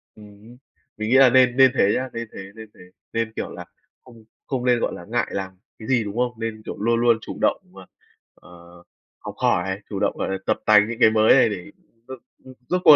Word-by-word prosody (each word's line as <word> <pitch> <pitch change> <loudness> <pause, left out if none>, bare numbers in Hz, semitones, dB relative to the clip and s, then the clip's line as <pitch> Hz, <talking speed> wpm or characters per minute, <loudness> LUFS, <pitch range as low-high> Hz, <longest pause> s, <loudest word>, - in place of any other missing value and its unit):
Ừm 105 - -14 0.2
hưm. 120 +3 -16 0.4
Mình 110 +1 -3
nghĩ 130 - +5
là 135 -1 +7
nên 125 0 +3
nên 130 -1 +6
thế 100 -5 +3
nhá, 130 0 -3
nên 115 -1 -5
thế, 95 0 -10
nên 110 -1 -11
thế. - - -18 0.3
Nên, 115 -1 -2
kiểu - - -4
là, - - -9 0.4
không 115 -3 -17 0.2
không 130 -2 -3
nên, 125 -1 +3
gọi - - -2
là, 85 - -10
ngại 120 +2 -1
làm 95 -1 -4 0.3
cái 110 - -10
gì, 125 -4 +2
đúng 105 +2 -7
hông? 120 -2 -2
Nên, 110 -1 -5
kiểu, - - -6
luôn 115 +3 +1
luôn 120 -1 +3
chủ - - -8
động - - +1
và, - - -14 0.5
ờ, 85 0 -17 0.4
học - - -9
hỏi, 95 +2 0
chủ 100 -2 -4
động, - - -1
gọi - - -3
là, 95 - -2
tập - - 0
tành 105 0 +5
những 115 - -6
cái 110 - +6
mới 110 0 +4
này - - +4
để, 95 -4 -7 0.4
ừm, 130 -1 -9 0.3
ừm, 130 - -12 0.2
rốt 180 0 0
cuộc 155 - +9
115 Hz, 240 wpm, -22 LUFS, 105-125 Hz, 0.5 s, cuộc